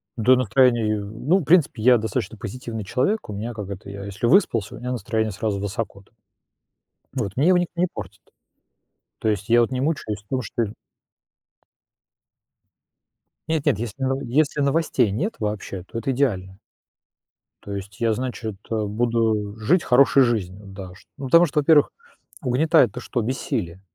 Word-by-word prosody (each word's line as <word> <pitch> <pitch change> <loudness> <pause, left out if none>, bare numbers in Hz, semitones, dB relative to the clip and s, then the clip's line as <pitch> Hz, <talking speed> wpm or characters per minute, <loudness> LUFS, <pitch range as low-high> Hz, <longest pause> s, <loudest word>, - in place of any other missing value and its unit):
Да, 125 +2 +5
настроение, 120 -2 +3
э, - - -3
ну, 110 - 0
в - - -4
принципе, 155 -6 +3
я 125 +1 +7
достаточно 110 -1 -3
позитивный 115 0 -6
человек. 135 - -1
У - - -4
меня, 115 +4 -4
как 105 -3 -7
это, 100 0 -8
я, 100 0 -7
если 100 +3 -4
выспался, 115 - +3
у - - -9
меня 125 +1 -4
настроение 110 -3 -1
сразу 100 0 -2
высоко 100 0 -4
там 100 - -28 1.0
вот 100 +3 -3
мне 145 - +3
его 185 0 +5
никто 175 0 -2
не 180 - +3
портит, - - -9 1.0
то 110 - 0
есть 100 0 -2
я 120 +1 +6
вот 120 - 0
не 130 0 -1
мучаюсь 125 -9 -2
в - - -42
том, 130 +3 -1
что 115 +1 -2 2.8
Нет-нет, 160 -9 +1
если 120 +3 -6
ново 135 +1 0
если 145 +4 +1
новостей 140 -5 +2
нет 170 - -2
вообще, 105 -3 -4
то 115 - -6
это 125 +4 -1
идеально. 95 -9 -1 1.1
То 100 - -7
есть 100 +1 -8
я, 115 -2 +2
значит, 120 -3 -4
э, 110 -2 -1
буду 110 -1 0
жить 155 - +2
хорошей 135 +1 +5
жизнью, 105 -4 -2
да? 95 -1 -9
Что 95 - -19
ну, 135 - -6
потому 170 +6 +6
что, 150 -1 0
во-первых, 150 0 +4 0.5
угнетает 145 +2 +3
то, - - -7
что- 125 0 -2
бессилие? 95 -7 -3
115 Hz, 170 wpm, -23 LUFS, 105-135 Hz, 2.8 s, я